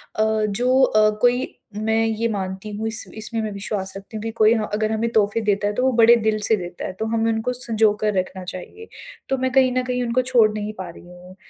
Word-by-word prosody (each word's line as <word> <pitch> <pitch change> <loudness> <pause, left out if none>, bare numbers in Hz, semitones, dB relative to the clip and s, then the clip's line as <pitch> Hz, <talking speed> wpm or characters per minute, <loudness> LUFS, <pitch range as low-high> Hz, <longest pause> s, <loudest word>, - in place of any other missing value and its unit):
अ, 215 - +2 0.3
जो 250 +6 +2
अ, 215 -4 +4
कोई 245 +1 +1 0.2
मैं 220 +1 +1
ये 225 +1 0
मानती 190 -1 -4
हूँ 220 +1 -2
इस 220 -1 -2
इसमें 220 +1 -3
मैं 215 -1 -3
विश्वास 200 -1 -4
रखती 200 +3 -9
हूँ - - -6
कि 225 - -3
कोई 220 0 +4
हाँ 215 -2 -2
अगर 215 +1 0
हमें 225 +1 0
तोहफे 215 0 +2
देता 205 -1 +1
है 205 - -1
तो 250 - 0
वो 260 - +3
बड़े 230 +1 +7
दिल 215 0 +2
से 220 - +4
देता 175 -3 -6
है - - -5
तो 220 - -1
हमें 225 0 +1
उनको 225 +3 -1
संजोकर 215 -3 +1
रखना 185 0 -5
चाहिए। 185 - -9 0.4
तो 270 - +1
मैं 260 0 -1
कहीं 260 -1 +4
न 255 - +1
कहीं 250 0 -2
उनको 240 +1 +1
छोड़ 245 -4 +4
नहीं 210 0 -4
पा 185 -2 -6
रही 170 - -13
हूँ, 180 +1 -14
220 Hz, 240 wpm, -22 LUFS, 205-235 Hz, 0.4 s, बड़े